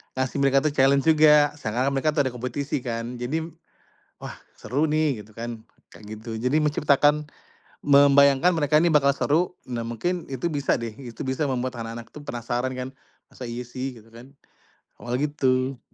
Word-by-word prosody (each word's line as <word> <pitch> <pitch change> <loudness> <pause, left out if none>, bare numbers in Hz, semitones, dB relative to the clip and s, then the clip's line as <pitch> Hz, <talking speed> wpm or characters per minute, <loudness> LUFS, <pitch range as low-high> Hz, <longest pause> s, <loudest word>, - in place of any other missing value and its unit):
ngasih 130 +1 -2
mereka 135 0 +3
tuh 155 - +2
challenge 135 0 +3
juga 150 -2 +6
seakan-akan 125 +3 -1
mereka 150 +2 +1
tuh 145 - +3
ada - - -3
kompetisi 125 +4 -3
kan 115 +1 -4
jadi, 145 +7 -2 0.8
wah - - -7 0.2
seru 135 +8 -1
nih 150 -6 0
gitu 110 - -19
kan 115 -1 -6 0.3
kayak 105 - -14
gitu 110 0 -6
jadi 125 +5 +1
menciptakan, 150 0 +2 0.6
membayangkan 140 +3 +5
mereka 150 0 +3
ini 170 - +3
bakal 140 -3 +4
seru 160 +6 0 0.2
nah 120 -2 -3
mungkin 170 +10 -3
itu 135 +6 -2
bisa 145 -4 0
deh 115 -2 -5
itu 120 -4 -11
bisa 130 +3 -1
membuat 130 -2 -2
anak-anak 115 0 -7
tuh 150 -1 -10
penasaran 120 +1 -3
kan, 125 0 -4 0.4
masa 130 - -10
iya 120 0 -5
sih? 130 +2 -5
Gitu 110 - -21
kan, 125 +4 -13 0.7
awalnya 125 +4 -1
gitu. 130 -2 0
135 Hz, 170 wpm, -24 LUFS, 120-145 Hz, 0.8 s, juga